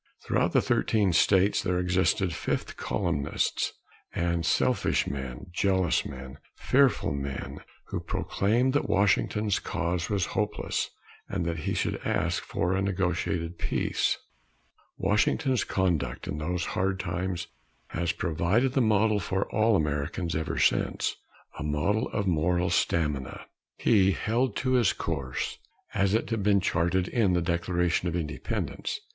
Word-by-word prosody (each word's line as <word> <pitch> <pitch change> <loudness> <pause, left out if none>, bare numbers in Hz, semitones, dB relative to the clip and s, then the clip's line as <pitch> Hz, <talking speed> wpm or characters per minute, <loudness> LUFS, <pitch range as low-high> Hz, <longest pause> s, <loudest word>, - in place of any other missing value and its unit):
Throughout - - +1
the - - +4
thirteen 100 -5 +2
states 95 +3 +4
there 90 -1 0
existed 90 +1 +1
fifth - - -3
columnists 70 0 -1 0.4
and 85 -1 0
selfish 80 - +2
men, 65 -3 -5
jealous 95 -1 +1
men, 65 +1 -9 0.2
fearful 135 - +2
men, 70 -1 -5 0.3
who - - -2
proclaimed 120 +6 0
that 145 - 0
Washington's 105 +1 +2
cause 85 -1 -2
was 100 -3 +1
hopeless, - - -1 0.4
and 95 -3 -2
that 85 -1 -2
he - - -1
should - - -1
ask - - 0
for 90 +2 -1
a 95 - +1
negotiated 90 -3 -1
peace. - - 0 0.8
Washington's 105 +6 +2
conduct 90 -7 -1
in 75 - -3
those 90 +3 -2
hard 95 0 0
times 90 -1 -2 0.4
has 85 -1 -1
provided 95 +9 +1
the 135 - +3
model 110 -1 +3
for 95 +1 -1
all 110 +1 +3
Americans 75 +2 -1
ever 80 0 -2
since - - +1 0.4
a - - -3
model 75 +10 0
of 100 -1 -2
moral 90 +1 +1
stamina. 75 -7 0 0.3
He 100 -4 +4
held 120 +7 0
to 130 - -1
his 120 -6 +4
course, 70 -6 -3 0.3
as 100 +1 +2
it 115 - -1
had 115 -2 0
been 100 0 +4
charted 90 +1 +1
in 105 -6 +2
the 90 - +2
Declaration 85 0 0
of 85 - -2
Independence. 80 -4 -3
90 Hz, 135 wpm, -28 LUFS, 85-100 Hz, 0.8 s, the